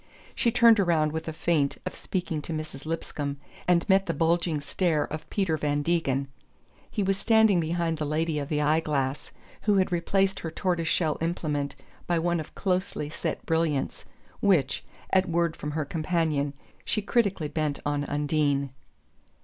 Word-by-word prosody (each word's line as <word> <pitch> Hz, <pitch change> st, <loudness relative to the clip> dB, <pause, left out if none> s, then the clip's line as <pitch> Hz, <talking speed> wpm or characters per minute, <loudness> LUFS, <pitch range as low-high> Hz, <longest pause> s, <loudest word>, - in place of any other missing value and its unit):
She 235 Hz, -, +2 dB
turned 230 Hz, -2 st, +6 dB
around 165 Hz, -5 st, +3 dB
with 160 Hz, +1 st, -4 dB
a -, -, -1 dB
feint 155 Hz, -3 st, +1 dB
of -, -, -3 dB
speaking 170 Hz, -5 st, -3 dB
to 165 Hz, -, -5 dB
Mrs. 155 Hz, -2 st, -6 dB
Lipscomb, 145 Hz, -3 st, -3 dB, 0.3 s
and 175 Hz, -1 st, +3 dB
met 195 Hz, -1 st, +4 dB
the 165 Hz, -, -1 dB
bulging 165 Hz, 0 st, +1 dB
stare 155 Hz, +1 st, +1 dB
of 155 Hz, 0 st, -6 dB
Peter 190 Hz, -6 st, 0 dB
Van 145 Hz, -1 st, 0 dB
Degen. 140 Hz, -5 st, +1 dB, 0.6 s
He 210 Hz, -, -1 dB
was 195 Hz, 0 st, +1 dB
standing 220 Hz, -5 st, +5 dB
behind 165 Hz, 0 st, -1 dB
the 150 Hz, -, -1 dB
lady 155 Hz, +1 st, 0 dB
of 140 Hz, 0 st, -4 dB
the 150 Hz, -1 st, +1 dB
eye 155 Hz, +2 st, +3 dB
glass, 140 Hz, -3 st, -2 dB, 0.3 s
who 210 Hz, -1 st, +3 dB
had 190 Hz, -1 st, +2 dB
replaced 195 Hz, +2 st, +1 dB
her 165 Hz, -, -4 dB
tortoise 170 Hz, 0 st, -1 dB
shell 155 Hz, -2 st, +1 dB
implement 150 Hz, -4 st, -1 dB, 0.3 s
by 175 Hz, -, +2 dB
one 170 Hz, +1 st, +1 dB
of 155 Hz, -, -8 dB
closely 185 Hz, -6 st, -1 dB
set -, -, -3 dB
brilliants, 160 Hz, -4 st, 0 dB, 0.4 s
which, 150 Hz, -9 st, +2 dB, 0.3 s
at 190 Hz, -1 st, +3 dB
word 170 Hz, -1 st, +1 dB
from 150 Hz, -, -5 dB
her 155 Hz, -1 st, -1 dB
companion, 155 Hz, -2 st, 0 dB, 0.3 s
she 215 Hz, -, -1 dB
critically 200 Hz, -7 st, +1 dB
bent 150 Hz, -1 st, -1 dB
on 145 Hz, 0 st, 0 dB
Undine. 145 Hz, -2 st, 0 dB
160 Hz, 165 wpm, -27 LUFS, 150-175 Hz, 0.6 s, turned